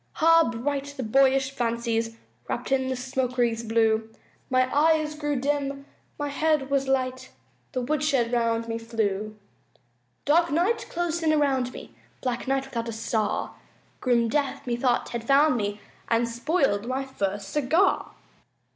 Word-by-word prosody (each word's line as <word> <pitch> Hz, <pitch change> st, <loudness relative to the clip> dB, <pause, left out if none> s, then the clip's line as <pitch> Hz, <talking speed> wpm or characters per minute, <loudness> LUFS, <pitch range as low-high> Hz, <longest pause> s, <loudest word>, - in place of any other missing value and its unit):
Ah, 330 Hz, -2 st, +6 dB
bright 280 Hz, +4 st, -3 dB
the 260 Hz, -, -3 dB
boyish 270 Hz, +3 st, +3 dB
fancies 230 Hz, -2 st, -1 dB, 0.3 s
Wrapped -, -, -4 dB
in 265 Hz, -1 st, +2 dB
the 260 Hz, -, -1 dB
smoke 255 Hz, 0 st, -2 dB
wreaths 235 Hz, -2 st, +1 dB
blue; 225 Hz, -1 st, +1 dB, 0.4 s
My 255 Hz, 0 st, +3 dB
eyes 310 Hz, 0 st, +3 dB
grew 295 Hz, -1 st, -2 dB
dim, 275 Hz, +1 st, -1 dB, 0.3 s
my 290 Hz, -1 st, -2 dB
head 300 Hz, -1 st, 0 dB
was 275 Hz, -1 st, +1 dB
light, 260 Hz, -1 st, -1 dB, 0.4 s
The 255 Hz, -, -1 dB
woodshed 280 Hz, -3 st, +1 dB
round 230 Hz, -1 st, +1 dB
me 230 Hz, 0 st, -3 dB
flew! 215 Hz, -2 st, -2 dB, 0.9 s
Dark 335 Hz, +4 st, +4 dB
night 360 Hz, +10 st, +1 dB
closed 345 Hz, -1 st, -2 dB
in 320 Hz, -1 st, +2 dB
around 270 Hz, -5 st, +1 dB
me -, -, -11 dB, 0.3 s
Black 250 Hz, 0 st, -3 dB
night, 270 Hz, 0 st, +1 dB
without 235 Hz, -3 st, -4 dB
a -, -, -2 dB
star 220 Hz, -1 st, -2 dB, 0.5 s
Grim 240 Hz, -2 st, +2 dB
death 285 Hz, +2 st, -1 dB
methought 240 Hz, 0 st, 0 dB
had 235 Hz, -1 st, -4 dB
found 280 Hz, +3 st, +4 dB
me 205 Hz, -2 st, -2 dB, 0.3 s
And 235 Hz, 0 st, +2 dB
spoiled 235 Hz, -, 0 dB
my 265 Hz, +2 st, -2 dB
first 200 Hz, -6 st, -3 dB
cigar. 300 Hz, -, +1 dB
260 Hz, 145 wpm, -26 LUFS, 230-285 Hz, 0.9 s, Ah